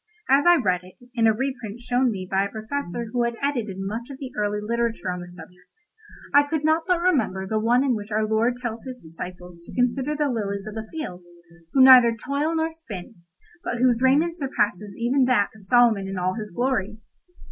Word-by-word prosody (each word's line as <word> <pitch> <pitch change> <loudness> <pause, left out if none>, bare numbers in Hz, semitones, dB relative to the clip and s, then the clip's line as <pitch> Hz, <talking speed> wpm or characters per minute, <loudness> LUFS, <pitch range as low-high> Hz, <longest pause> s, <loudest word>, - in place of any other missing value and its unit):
As 275 +5 +4
I 350 - +8
read 185 - +1
it, 185 0 -15 0.2
in 230 -2 +3
a - - +6
reprint 240 -2 -4
shown 245 +1 +1
me 190 -4 -4
by 195 +1 +1
a - - -5
Professor 220 -1 -5
who 245 - +1
had 235 0 0
edited 240 -9 -2
much 215 +6 -5
of 275 - -8
the 265 -2 -7
early 210 0 -1
literature 230 -2 -2
on 180 - -4
the 175 0 -9
subject, 180 - -15 0.5
I 285 - +8
could 290 +1 -2
not 320 +1 +2
but 360 -2 +2
remember 255 - +1
the 215 +3 -1
one 240 +4 +3
in 270 -3 +2
which 210 -2 -5
our 215 +1 +1
Lord 230 +3 +1
tells 235 -2 -5
His 255 -1 -7
disciples 175 -1 -10
to 170 - -13
consider 255 +4 0
the 295 0 0
lilies 200 -4 -3
of 215 - -7
the 220 0 -6
field, 185 - -6 0.5
who 265 - +6
neither 250 -3 +8
toil 285 +7 -1
nor 320 0 0
spin, 240 - -9 0.5
but 245 - -3
whose 245 -1 +2
raiment 310 +6 +3
surpasses 210 -7 -2
even 250 +3 +2
that 240 -6 +2
of 200 -3 -16
Solomon 230 -4 +4
in 195 0 -5
all 185 +1 0
his 215 -1 -6
glory. 215 -1 -1
235 Hz, 210 wpm, -24 LUFS, 200-265 Hz, 0.5 s, I